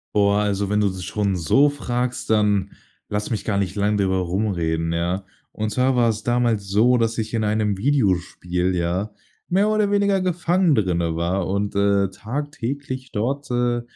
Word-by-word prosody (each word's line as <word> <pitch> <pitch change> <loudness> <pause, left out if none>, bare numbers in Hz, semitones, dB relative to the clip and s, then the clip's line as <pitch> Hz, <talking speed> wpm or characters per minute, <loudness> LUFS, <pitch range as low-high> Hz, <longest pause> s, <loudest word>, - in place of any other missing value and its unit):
Boah, 100 0 +3
also 100 -1 0
wenn 105 - +1
du 105 - +3
das 95 -2 -4
schon 100 -1 -1
so 135 - +3
fragst, 125 -4 -3
dann 105 -3 +2 0.4
lass 105 0 -2
mich 105 -4 -2
gar 100 -3 0
nicht 95 -1 -1
lang 105 0 +1
drüber 95 -1 +1
rumreden, 85 -3 -1
ja? 90 +3 -1 0.3
Und 110 0 -3
zwar 130 +2 +2
war 120 -2 +3
es 110 -1 -3
damals 120 -4 0
so, 120 +5 +4
dass 115 0 0
ich 110 0 -3
in 110 -1 0
einem 105 -1 0
Videospiel, 95 - 0
ja, 90 +5 -1 0.4
mehr 195 +4 +3
oder 215 -1 +1
weniger 200 -1 +2
gefangen 180 -2 +2
drinne 85 -6 0
war 85 +2 -1
und, 100 +2 -2
äh, 100 -1 +2
tagtäglich 130 +3 -5
dort, 135 +7 -2
äh, 120 0 +1
105 Hz, 170 wpm, -22 LUFS, 95-125 Hz, 0.4 s, so